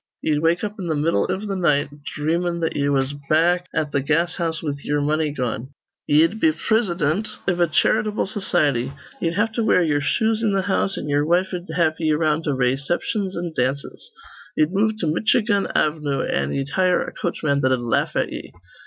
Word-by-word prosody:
Ye'd 150 -2 +1
wake 165 +2 +2
up 210 0 -4
in 180 - -4
th' 155 - 0
middle 160 +3 +1
iv 190 +1 -2
th' 200 -2 -3
night, 150 -6 +1 0.3
dhreamin' 170 +3 0
that 165 - -1
ye 140 0 +1
was 135 0 +1 0.2
back 175 +3 +3
at 150 -1 -1
th' 140 -2 0
gas 165 +4 +1
house 165 -2 -2
with 145 -2 -4
ye'er 145 0 0
money 155 +1 +1
gone. 130 0 -4 0.3
Ye'd 165 +8 +3
be 160 - +4
prisidint 185 -1 0 0.2
iv 180 -2 +1
a 175 - +4
charitable 215 +6 +1
society. 145 - 0 0.3
Ye'd 165 0 0
have 220 +3 +1
to 230 +1 -1
wear 180 -4 +4
ye'er 145 -3 +1
shoes 220 +7 +1
in 205 -4 +1
th' 190 - -2
house, 195 0 0
an' - - -5
ye'er 145 0 +2
wife'd 180 +2 0
have 160 -3 +1
ye 160 -2 +1
around 155 +1 +1
to 145 -3 0
rayciptions 140 - -1
an' 170 -1 -4
dances. 135 - -2 0.5
Ye'd 155 +3 +2
move 215 +3 +2
to - - 0
Mitchigan 205 +5 +1
Avnoo, 150 -2 0
an' 70 +1 -1
ye'd 135 0 -2
hire 185 +2 +2
a - - -8
coachman 150 -5 -1
that'd 130 -1 +2
laugh 120 -1 0
at - - 0
ye. - - -7
160 Hz, 195 wpm, -22 LUFS, 145-185 Hz, 0.5 s, be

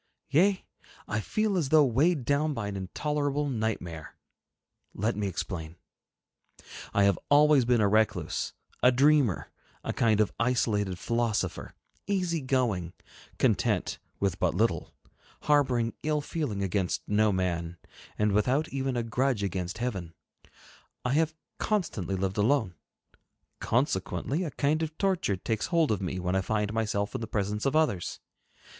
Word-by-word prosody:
Yea, 185 +6 +3 0.4
I 110 - -1
feel 215 - 0
as 160 -7 0
though 155 -1 +6
weighed 140 +3 +2
down 145 +2 +1
by 110 -4 -3
an 100 - -4
intolerable 145 +9 -1
nightmare. 110 - -3 0.8
Let 110 +4 0
me 105 -1 -1
explain. 85 -3 -5 1.2
I 100 - +3
have 100 -2 +3
always 145 -2 +6
been 120 -2 +3
a 105 - +4
recluse, 110 +1 +1 0.3
a 125 - +6
dreamer, 135 - +3 0.3
a - - -2
kind 110 -2 +2
of 110 - +2
isolated 105 -6 +1
philosopher, 115 +2 -1 0.3
easy 180 -5 0
going, 120 -10 0 0.4
content - - +1 0.2
with 95 -2 0
but 90 -2 +1
little, 90 -6 0 0.5
harboring 130 -6 +2
ill 150 -1 0
feeling 140 -10 -3
against 95 -1 -1
no 105 +1 +3
man, 90 -2 -2 0.4
and 105 0 +2
without 130 +10 +1
even 135 -2 -2
a 120 - 0
grudge 120 -1 0
against 90 -1 -3
heaven. 95 -9 -4 0.9
I 125 - +1
have 160 +1 +1 0.2
constantly 110 - -1
lived 95 +1 -2
alone; 110 -3 +2 0.9
consequently, 125 - 0
a - - -2
kind 150 +3 0
of 160 -1 -4
torture 185 - +1
takes 110 +3 -2
hold 165 -5 +2
of 105 - 0
me 95 0 -3
when 90 +1 -1
I 95 - +2
find 105 +1 -1
myself 105 -2 -1
in - - -3
the 115 - -4
presence 105 +3 -1
of 135 - 0
others. 150 - +1
115 Hz, 145 wpm, -28 LUFS, 100-145 Hz, 1.2 s, though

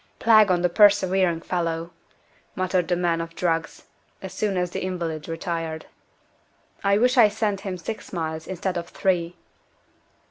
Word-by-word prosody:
"Plague 215 -2 +5
on 180 -1 +2
the - - +5
persevering 190 -3 +3
fellow!" 170 -1 -2 0.6
muttered 185 -2 0
the 175 - +1
man 170 -1 0
of 165 0 -8
drugs, 165 -2 -2 0.4
as - - -8
soon 205 -3 -1
as 180 -1 -1
the - - -4
invalid 170 -5 -4
retired. 165 -1 -4 1.0
"I 200 0 +3
wish 250 +4 +2
I'd 210 -3 +6
sent 205 -3 -1
him 190 -2 -4
six 215 +6 -7
miles, 160 -2 -4
instead 185 0 -3
of 170 0 -5
three." 175 -2 -1
180 Hz, 150 wpm, -24 LUFS, 165-195 Hz, 1.0 s, I'd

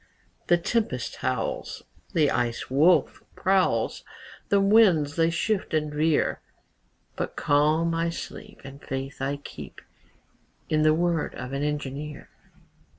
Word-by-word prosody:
The 175 - +5
tempest 170 - -2
howls, 130 -3 -3 0.3
The 155 -4 +3
Ice 120 +1 -2
Wolf 160 +7 +3
prowls, 190 0 +1 0.5
The 200 - +4
winds 195 -8 +4
they 165 0 +3
shift 185 +1 -1
and 150 -1 -1
veer, 155 +1 +1 0.7
But - - -4
calm 155 +3 +2
I 165 0 0
sleep, 165 - -8
And 135 +1 -11
faith 135 0 -5
I 140 +1 -1
keep 145 - -10 0.9
In 155 0 +2
the 155 0 +4
word 170 -1 0
of 125 +2 -6
an 140 - -2
engineer. 150 0 -4
155 Hz, 125 wpm, -26 LUFS, 140-170 Hz, 0.9 s, The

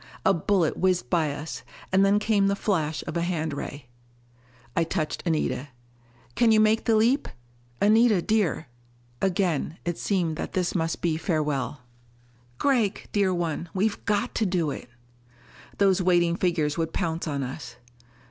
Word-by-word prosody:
A 195 - +5
bullet 175 -1 +1
whizzed 180 -10 +1
by 160 -4 +2
us, 145 +3 -6 0.3
and 190 +1 +4
then 200 +1 +4
came 210 -2 +2
the 200 - +1
flash 160 -7 -1
of - - -5
a 170 - 0
hand 165 -3 -1
ray. 140 -1 -6 0.9
I 165 - +3
touched 160 -2 -2
Anita. 155 -4 0 0.7
"Can 230 - +3
you 220 - +5
make 215 +1 +3
the 225 - +3
leap? 240 +6 +3 0.5
Anita 215 0 +5
dear...." 205 -4 0 0.6
Again 175 -4 0
it 175 -1 -2
seemed 175 -6 0
that - - -5
this 180 -2 0
must 165 -2 -2
be 165 -2 +1
farewell. 150 -5 -1 0.8
"Gregg, 235 -8 +1
dear 200 -2 +2
one, 170 -1 -2
we've 205 +2 0
got 205 -1 0
to 220 - 0
do 175 -5 0
it!" 125 - -8 0.9
Those 195 -2 +3
waiting 175 -2 +3
figures 165 -4 0
would 160 0 -2
pounce 165 -2 -2
on 140 -2 -2
us. 125 -2 -7
175 Hz, 155 wpm, -26 LUFS, 160-200 Hz, 0.9 s, A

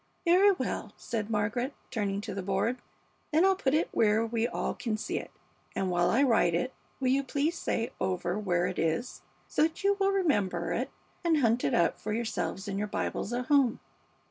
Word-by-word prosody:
"Very 370 +4 +6
well," - - -4
said 220 -3 -3
Margaret, 225 +5 -1 0.2
turning 200 -3 -1
to 210 -1 -5
the 195 - -3
board; 200 +6 0 0.5
"then 320 +4 +4
I'll 385 0 +4
put 285 -7 +1
it 315 - +2
where 220 0 +3
we 230 0 0
all - - -2
can 230 -4 -2
see - - -2
it, - - -9 0.5
and 190 -1 0
while 175 0 +2
I 265 +5 +4
write 225 -10 +3
it 255 +9 -1 0.3
will 260 -1 +1
you 270 +2 +3
please 290 +4 0
say 230 -7 -2
over 180 +1 -1
where 175 -4 +1
it 185 0 -3
is, 165 +10 -1 0.3
so - - 0
that 320 +4 +1
you 400 0 +3
will 390 0 +3
remember 295 - +1
it - - -1 0.3
and 335 -2 +3
hunt 240 -3 +2
it 140 - +2
up 170 - +2
for 210 - -3
yourselves 220 -3 -2
in 195 0 -2
your 210 - -1
Bibles 205 - -3
at 245 +1 -2
home?" 275 -4 +3
230 Hz, 200 wpm, -29 LUFS, 200-280 Hz, 0.5 s, Very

